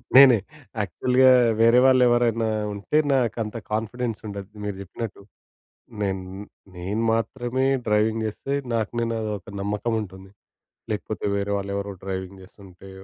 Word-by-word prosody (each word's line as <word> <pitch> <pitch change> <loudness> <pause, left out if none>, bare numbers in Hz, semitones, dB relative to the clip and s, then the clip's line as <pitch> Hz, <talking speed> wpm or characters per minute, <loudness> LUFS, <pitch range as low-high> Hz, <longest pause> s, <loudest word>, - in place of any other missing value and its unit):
నేనే. 130 -3 +9 0.4
యాక్చువల్‌గా 125 +7 +3 0.3
వేరే 115 +2 +6
వాళ్ళెవరైనా 120 -3 +4 0.2
ఉంటే, 100 +9 -1 0.2
నాకంత 115 -3 0 0.2
కాన్ఫిడెన్స్ 115 +1 -2
ఉండదు. 100 -1 -7 0.2
మీరు 100 -1 -3
జెప్పినట్టు. 100 +2 -7 0.8
నేన్ 95 -2 -1 0.5
నేను 95 +5 -3
మాత్రమే 120 +3 -1 0.2
డ్రైవింగ్ 110 +1 +2
జేస్తే, 135 +6 -3 0.2
నాకు 110 -2 0
నేనో 115 -1 -1 0.2
ఒక 100 +2 -13
నమ్మకం 105 +3 -1
ఉంటుంది. 95 -1 -10 0.6
లేకపోతే, 105 -1 -4
వేరే 100 0 -1
వాళ్ళెవరో 100 0 -4
డ్రైవింగ్ 95 0 -5
జేస్తుంటే, 95 -1 -15
105 Hz, 115 wpm, -24 LUFS, 100-120 Hz, 0.8 s, నేనే